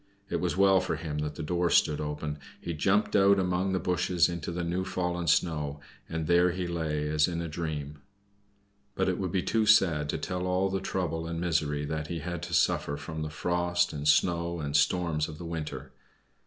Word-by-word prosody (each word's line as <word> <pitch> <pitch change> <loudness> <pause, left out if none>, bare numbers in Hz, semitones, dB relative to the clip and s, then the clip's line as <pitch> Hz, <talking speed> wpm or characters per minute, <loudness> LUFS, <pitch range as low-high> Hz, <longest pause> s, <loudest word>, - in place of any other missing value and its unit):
It - - +1
was - - -1
well 95 -1 +5
for - - -2
him 75 -1 -4
that 75 0 -3
the 80 - -5
door 85 +2 0
stood 75 -3 +3
open. 75 0 -4 0.2
He 85 - -4
jumped 95 +7 +1
out 100 0 +6
among 90 0 0
the 95 - +1
bushes 90 -1 +2
into 85 -2 -4
the 85 0 -3
new 90 +2 -1
fallen 90 -2 -2
snow, 75 -2 +1 0.3
and 80 -1 -3
there 85 +2 +4
he 90 0 -3
lay 80 -3 -2
as 75 0 +3
in 85 -2 -3
a 85 - -3
dream. 75 -3 -4 1.0
But 95 - +1
it 90 - -1
would 95 -2 -2
be 95 -2 0
too 110 -1 +1
sad 85 -9 +4
to - - -1
tell 90 0 -3
all 90 +1 +1
the 95 - 0
trouble 80 -3 -2
and 85 0 -3
misery 75 -4 0
that 75 0 -3
he 85 - -4
had 85 +3 -4
to - - -6
suffer 70 - +1
from 80 +2 -6
the 75 - -3
frost, 90 +2 0
and 75 0 -3
snow 85 +2 +2
and 75 -1 -3
storms 75 +1 +2
of 75 - -8
the 85 - -8
winter. 80 -2 -5
85 Hz, 210 wpm, -29 LUFS, 75-90 Hz, 1.0 s, out